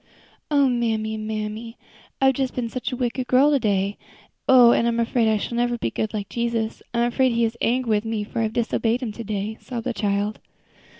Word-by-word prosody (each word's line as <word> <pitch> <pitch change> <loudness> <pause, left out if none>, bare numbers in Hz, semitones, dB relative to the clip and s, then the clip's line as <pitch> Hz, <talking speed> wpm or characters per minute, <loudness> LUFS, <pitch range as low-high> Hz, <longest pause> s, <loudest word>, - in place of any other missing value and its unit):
"O 285 -2 +4
mammy, 225 -3 0
mammy! 215 +1 -5 0.4
I've 270 0 +4 0.2
been 240 -2 -2
such 255 +3 -4
a - - -2
wicked 250 0 -2
girl 270 +4 +5
to 285 - +3
day! 200 -3 0 0.5
Oh! 250 -2 +8
I'm 235 0 +2
afraid 230 0 +2
I 220 -1 +3
shall 235 +3 -4
never 240 0 +1
be - - -2
good, - - -4
never 220 - +1
be - - -1
like 200 - -5
Jesus. 235 -2 -2
I'm 235 0 +1
afraid 245 +1 +2
He 235 0 +2
is 225 +1 -2
angry 245 0 +1
with 210 +1 +1
me, 225 -2 -2
for 215 - -5
I - - +2
have - - -15
disobeyed 235 +1 0
Him 230 - -3
to 230 +2 -7
day," 210 +1 -3
sobbed 235 -3 -6
the 250 - -1
child. 205 0 -1
230 Hz, 220 wpm, -23 LUFS, 215-245 Hz, 0.5 s, Oh